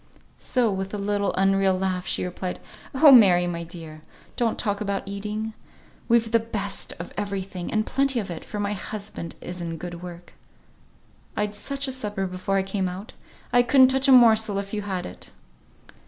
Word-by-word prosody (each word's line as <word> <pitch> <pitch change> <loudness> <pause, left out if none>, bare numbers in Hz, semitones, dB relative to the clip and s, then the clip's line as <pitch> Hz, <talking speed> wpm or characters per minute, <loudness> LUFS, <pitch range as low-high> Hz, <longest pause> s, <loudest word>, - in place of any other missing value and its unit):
So, 245 -4 +1
with 190 +1 -3
a - - -3
little 200 0 0
unreal 195 0 +3
laugh, 185 -1 -2
she - - -1
replied, 180 0 -4 0.4
"Oh! 295 +2 +8
Mary, 190 -8 +7
my 170 -1 -3
dear! 165 -2 -9 0.3
don't 230 -2 0
talk 205 -2 -1
about 200 -1 -1
eating. 210 +2 -4 0.5
We've 230 -1 +3
the 230 - +5
best 205 -3 -4
of - - -8
every 200 -2 -2
thing, 185 -2 -6
and 215 -1 +1
plenty 270 -2 +1
of 195 -5 -5
it, 165 - -6
for 210 - -6
my 205 0 -1
husband 200 -4 -6
is 180 0 -6
in 165 -1 -4
good 175 +1 -7
work. 175 -1 -10 1.0
I'd 210 0 -1
such 275 +6 -3
a - - -2
supper 210 -6 -2
before 185 +1 -2
I 190 - +2
came 190 -1 -2
out. 190 +5 -8 0.4
I 245 - +7
couldn't 260 +1 +6
touch 265 +1 +3
a - - +6
morsel 220 -4 +6
if 200 +1 -4
you 210 - -1
had 190 -3 -3
it." 90 - -10
200 Hz, 185 wpm, -25 LUFS, 185-220 Hz, 1.0 s, Oh